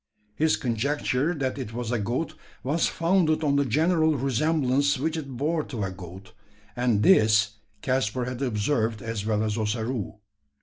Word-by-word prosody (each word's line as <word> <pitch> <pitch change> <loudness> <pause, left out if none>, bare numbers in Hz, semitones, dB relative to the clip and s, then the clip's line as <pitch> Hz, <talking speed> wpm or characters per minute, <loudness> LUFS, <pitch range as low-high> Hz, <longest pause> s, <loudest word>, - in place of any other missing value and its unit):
His 155 +8 +2
conjecture 135 +5 0
that 135 -2 -2
it 115 -4 -6
was 120 -1 -3
a 120 - 0
goat 125 +10 -2 0.3
was 150 +6 +1
founded 165 -2 +1
on 140 -2 +2
the 140 0 +2
general 155 +4 +2
resemblance 140 +1 +1
which 160 +4 -1
it 140 -6 -6
bore 155 +4 0
to 115 -6 -4
a 95 - -2
goat; 95 +3 -11 0.4
and 120 -4 +1
this 105 -1 +4 0.3
Caspar 130 -1 0
had 125 +1 -5
observed 115 -2 0
as 115 -3 -3
well 110 -1 +1
as 110 +1 -1
Ossaroo. 110 0 -2
125 Hz, 160 wpm, -26 LUFS, 110-150 Hz, 0.4 s, this